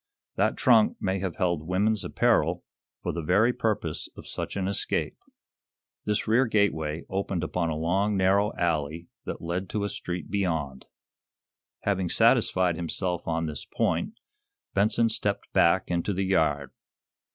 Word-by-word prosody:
That - - +1
trunk 220 +2 +4
may 95 0 -1
have 95 -3 -3
held 85 -3 -1
woman's 100 +3 +1
apparel - - +1 0.4
for - - -1
the 85 - -3
very 100 +9 +3
purposes 105 -10 -2
of - - -10
such - - -4
an 95 -2 -1
escape." 100 - -1 0.9
This 105 +1 0
rear 120 +4 +4
gateway 80 -8 0
opened 95 -2 -2
upon 85 0 -1
a 80 - -2
long, 95 +6 +1
narrow 100 +2 +3
alley 85 0 -1 0.2
that - - -5
led 90 +3 -3
to 105 - -2
a 100 - -1
street 90 -1 -5
beyond. 80 -10 -2 1.0
Having 95 -3 0
satisfied 90 -1 +3
himself 90 +1 -2
on 80 0 0
this 75 -3 -5
point, 85 - -1 0.6
Benson 110 +3 +3
stepped - - -2
back - - +3
into 85 +4 0
the 95 +1 -1
yard. 75 -7 +1
90 Hz, 145 wpm, -27 LUFS, 85-100 Hz, 1.0 s, trunk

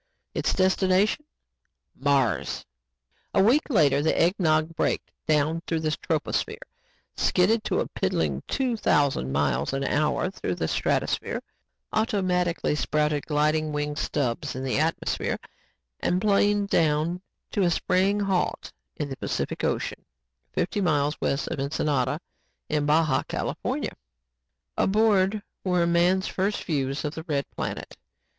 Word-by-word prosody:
Its - - 0
destination 190 +6 +2 0.7
Mars! 140 -2 +1 0.7
A 190 - +5
week 260 +10 +3
later, 145 - +4
The 160 - +1
Eggnog 165 -3 +2
braked - - -1 0.2
down 155 +2 +2
through 165 -1 0
the 155 -1 0
troposphere, - - -1 0.6
skidded 215 +5 +2
to - - +1
a - - -2
piddling - - -1
two 260 -3 0
thousand 140 - +1
miles, 70 - 0
an 135 0 -1
hour 150 +6 +1
through 90 - -3
the 80 - -2
stratosphere, - - 0 0.5
automatically 185 -7 +1
sprouted 150 0 0
gliding 155 +1 +1
wing 150 0 -2
stubs 145 -1 -2
in 130 - -4
the 135 +1 0
atmosphere 160 +2 0 0.6
and 180 - +1
planed 205 0 +2
down 160 +2 +2 0.3
to 205 - 0
a 180 - +4
spraying 190 +4 +2
halt 195 -3 -1 0.2
in 145 - -3
the 135 -1 -6
Pacific - - -3
Ocean, - - -1 0.5
fifty 205 +3 -1
miles 150 -4 +1
west 140 - 0
of - - -3
Ensenada 145 +1 0 0.5
in 145 -1 0
Baja, 155 +1 +3
California. - - -3 0.8
Aboard 205 -1 +3 0.2
were 180 -2 +2
man's 175 +3 +3
first 200 +2 -1
views 140 -3 -1
of 150 - -2
the 160 - -5
red 140 -3 0
planet. - - -5
160 Hz, 130 wpm, -26 LUFS, 150-190 Hz, 0.8 s, A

